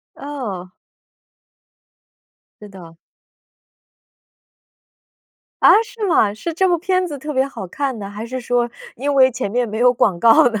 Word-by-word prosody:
哦。 225 Hz, -11 st, -6 dB, 1.9 s
是 210 Hz, -, -10 dB
的。 170 Hz, -4 st, -14 dB, 2.7 s
啊， -, -, +8 dB
是 445 Hz, -2 st, -6 dB
吗？ 215 Hz, -, +3 dB
是 330 Hz, +10 st, -5 dB
这 375 Hz, +3 st, +2 dB
部 350 Hz, -1 st, +2 dB
片 370 Hz, +2 st, 0 dB
子 300 Hz, -5 st, -6 dB
特 300 Hz, +3 st, -6 dB
别 265 Hz, 0 st, +1 dB
好 275 Hz, -8 st, -7 dB
看 265 Hz, +4 st, -3 dB
呢？ 200 Hz, -1 st, -7 dB
还 210 Hz, +2 st, -7 dB
是 255 Hz, +2 st, -5 dB
说 240 Hz, -1 st, -1 dB, 0.2 s
因 285 Hz, +4 st, -2 dB
为 260 Hz, -1 st, +5 dB
前 250 Hz, -4 st, -4 dB
面 240 Hz, +2 st, -1 dB
没 215 Hz, +1 st, -5 dB
有 245 Hz, +1 st, +4 dB
广 200 Hz, -7 st, +1 dB
告 230 Hz, +1 st, +6 dB
呢？ 220 Hz, -3 st, -3 dB
245 Hz, 160 characters per minute, -19 LUFS, 210-290 Hz, 2.7 s, 啊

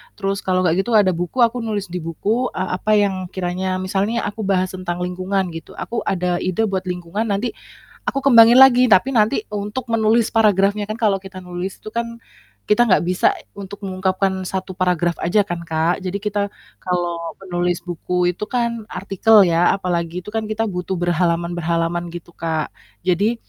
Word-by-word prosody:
terus 195 Hz, -1 st, -2 dB
kalau 185 Hz, -1 st, 0 dB
nggak 170 Hz, -2 st, +2 dB
gitu 230 Hz, +3 st, -1 dB
ada 205 Hz, -3 st, +5 dB
buku 175 Hz, +2 st, -4 dB, 0.2 s
nulis 210 Hz, -5 st, -3 dB
di 180 Hz, -, -3 dB
buku, 205 Hz, +9 st, -1 dB
eee, 185 Hz, 0 st, -2 dB
apa 215 Hz, -, -1 dB
yang 195 Hz, -3 st, +1 dB
kiranya 185 Hz, +1 st, -2 dB
misal 195 Hz, +1 st, 0 dB
nih 230 Hz, +1 st, -1 dB
aku 205 Hz, +2 st, -4 dB
bahas 185 Hz, -2 st, +1 dB
tentang 180 Hz, -1 st, -4 dB
lingkungan 185 Hz, +2 st, -1 dB
gitu, 165 Hz, -1 st, -9 dB
aku 235 Hz, -, -4 dB
ada 180 Hz, -1 st, 0 dB
ide 185 Hz, +4 st, 0 dB
buat 190 Hz, -1 st, -2 dB
lingkungan 180 Hz, +5 st, -3 dB
nanti, 205 Hz, +3 st, -1 dB, 0.5 s
aku 275 Hz, -, -1 dB
kembangin 240 Hz, -2 st, +7 dB
lagi 255 Hz, -1 st, +7 dB
tapi 245 Hz, +8 st, +4 dB
nanti 220 Hz, +4 st, +3 dB
untuk 210 Hz, +5 st, -4 dB
menulis 225 Hz, 0 st, +2 dB
paragrafnya, 205 Hz, -1 st, +3 dB
kan 215 Hz, +2 st, -4 dB
kalau 210 Hz, -4 st, +3 dB
kita 190 Hz, -1 st, -9 dB
nulis 180 Hz, +1 st, -6 dB
itu -, -, -14 dB
kan, 235 Hz, 0 st, -3 dB, 0.4 s
kita 240 Hz, +3 st, +3 dB
nggak 185 Hz, -, +4 dB
bisa 180 Hz, +1 st, +2 dB, 0.2 s
untuk 200 Hz, +1 st, -9 dB
mengungkapkan 190 Hz, 0 st, 0 dB, 0.2 s
1 190 Hz, 0 st, -4 dB
paragraf 180 Hz, -2 st, 0 dB
aja 205 Hz, +5 st, +2 dB
kan 175 Hz, -3 st, -4 dB
Kak. 160 Hz, +2 st, +1 dB
Jadi 190 Hz, 0 st, -4 dB
kita 205 Hz, -1 st, -1 dB, 0.3 s
kalau 175 Hz, -2 st, -3 dB
penulis 175 Hz, -2 st, -2 dB
buku 180 Hz, 0 st, -1 dB
itu 210 Hz, +4 st, -6 dB
kan 235 Hz, -3 st, -2 dB
artikel 205 Hz, +2 st, +4 dB
ya 175 Hz, 0 st, +3 dB
apalagi, 175 Hz, -2 st, -2 dB
itu 210 Hz, -, -9 dB
kan 220 Hz, 0 st, -2 dB
kita 215 Hz, +1 st, -1 dB
butuh 180 Hz, +1 st, -3 dB
berhalaman-berhalaman 170 Hz, -1 st, 0 dB
gitu 175 Hz, 0 st, -9 dB
Kak, 160 Hz, -2 st, -3 dB, 0.3 s
jadi, 190 Hz, +6 st, +2 dB
190 Hz, 175 wpm, -20 LUFS, 175-210 Hz, 0.5 s, kembangin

